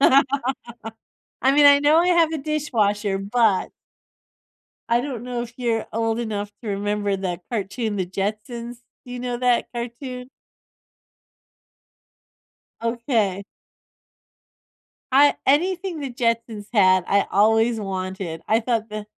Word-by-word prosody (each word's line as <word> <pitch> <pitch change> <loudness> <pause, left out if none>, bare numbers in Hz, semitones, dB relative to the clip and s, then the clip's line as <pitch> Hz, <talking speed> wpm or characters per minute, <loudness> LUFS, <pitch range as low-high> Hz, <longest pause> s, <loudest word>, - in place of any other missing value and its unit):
I 275 0 +4 1.1
mean, 290 +1 +5
I 285 0 +8
know 295 +2 +4
I 350 - +3
have 335 -3 +4
a 320 - -2
dishwasher, 220 -10 0
but 205 0 +1 1.2
I 235 +1 +3
don't 250 -3 -5
know 245 -1 -3
if 235 - -8
you're 235 -3 -1
old 225 0 0
enough 205 -2 -4
to 225 - -6
remember 205 0 -1
that 180 -2 -4
cartoon, 220 0 -2
The 185 -2 -1
Jetsons. 220 +5 -4 0.3
You 245 0 -7
know 245 0 -3
that 245 -1 +2
cartoon? 250 +1 -6 2.5
Okay. 230 -5 -1 1.7
I 285 +2 +6
anything 345 +4 +1
The 275 -2 -4
Jetsons 230 -3 -2
had, 185 -4 +4
I 200 0 +2
always 225 +3 +3
wanted. 185 -4 -4
I 220 +1 +3
thought 230 -2 -1
that 210 0 -6
230 Hz, 120 wpm, -23 LUFS, 205-255 Hz, 2.5 s, I